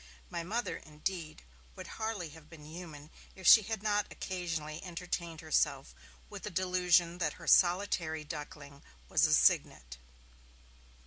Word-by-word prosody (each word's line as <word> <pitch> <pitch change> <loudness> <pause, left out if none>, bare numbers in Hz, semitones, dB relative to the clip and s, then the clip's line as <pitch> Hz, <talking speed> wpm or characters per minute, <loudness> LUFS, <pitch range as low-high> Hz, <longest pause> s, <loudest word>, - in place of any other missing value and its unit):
My 170 - -3
Mother, 220 +8 -2
indeed, 155 - -6 0.3
would - - -8 0.2
hardly 215 -7 -3
have 155 0 -15
been 155 -3 -13
human 155 -2 -10 0.2
if 190 - -11
she 220 - +10
had 215 0 -5
not 210 -1 +1
occasionally 165 -4 -4
entertained 170 -2 -5
herself 150 -3 0 0.3
with 205 -2 -9
the 210 - -5
delusion 180 -1 +2
that 155 -4 0
her - - -12
solitary 175 -4 +3
duckling 145 -1 -9 0.3
was - - +4
a - - +2
cygnet. 65 0 +2
170 Hz, 135 wpm, -32 LUFS, 155-185 Hz, 0.3 s, she